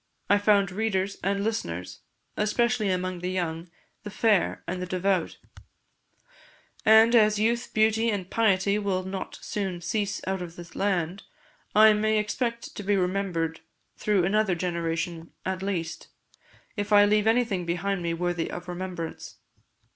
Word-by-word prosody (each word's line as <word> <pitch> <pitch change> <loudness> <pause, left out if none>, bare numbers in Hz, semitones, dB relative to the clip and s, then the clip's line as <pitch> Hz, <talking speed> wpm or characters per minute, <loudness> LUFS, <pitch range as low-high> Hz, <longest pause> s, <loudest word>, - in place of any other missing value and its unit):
I 205 - +5
found 205 -2 +3
readers 195 -1 -1
and 200 +1 0
listeners, 90 - -3 0.4
especially 215 0 +1
among 185 -1 -1
the 180 +1 -3
young, 170 -2 -3 0.3
the 210 - -7
fair, 210 -2 +1
and 180 +1 -4
the 180 - -4
devout; 185 -1 0 1.5
and 220 +2 +6
as 215 -2 +5
youth, 235 +3 0
beauty, 220 +1 +2
and 200 -4 -2
piety 200 -1 +2
will 195 -3 -1
not 190 +1 -6
soon 190 -4 -3
cease 205 +3 -2
out 190 0 -2
of 170 -1 -7
the 175 -1 -9
land, 190 -1 -1 0.5
I 215 0 +8
may 215 +1 +1
expect 235 +3 -2
to - - -4
be 205 0 +1
remembered 180 -4 -1 0.4
through 205 -4 +1
another 205 -1 +2
generation 170 -1 -3
at 190 0 -2
least, 175 -4 -3 0.7
if 205 -1 -3
I 205 0 +7
leave 210 +1 +2
anything 225 -6 +1
behind 180 +3 -1
me 170 -1 -1
worthy 175 -1 -2
of 175 0 -7
remembrance. 180 -2 -6
195 Hz, 145 wpm, -26 LUFS, 180-210 Hz, 1.5 s, I